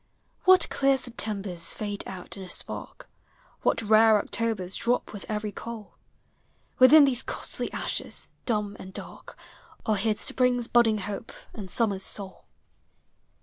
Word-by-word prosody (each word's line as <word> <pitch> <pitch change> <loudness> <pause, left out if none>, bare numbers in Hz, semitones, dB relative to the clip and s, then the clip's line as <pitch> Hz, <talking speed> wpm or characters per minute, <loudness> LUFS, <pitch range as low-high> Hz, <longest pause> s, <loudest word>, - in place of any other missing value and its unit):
What 370 0 +6
clear 275 -1 +2
Septembers 205 -8 -1
fade 205 -1 -4
out 185 -2 -7
in 195 - -9
a 185 - -9
spark! - - -5 0.6
W - - +4
hat 225 - -1
rare 220 0 +6
Octobers 205 -3 -1
drop 245 -1 0
with 205 - -8
every 210 -1 -2
coal! 225 0 -8 0.9
Within 285 +3 +8
these 255 -3 +1
costly - - -3
ashes, - - -3 0.2
dumb 210 -3 -1
and 190 +1 -10
dark, - - -9 0.5
Are 215 -1 +1
hid 215 +1 0
spring's 250 -2 +1
budding 230 -3 +4
hope, 205 +2 -6 0.2
and 200 -4 -8
summer's 200 -2 0
soul. 195 -1 -4
215 Hz, 140 wpm, -27 LUFS, 200-235 Hz, 0.9 s, Within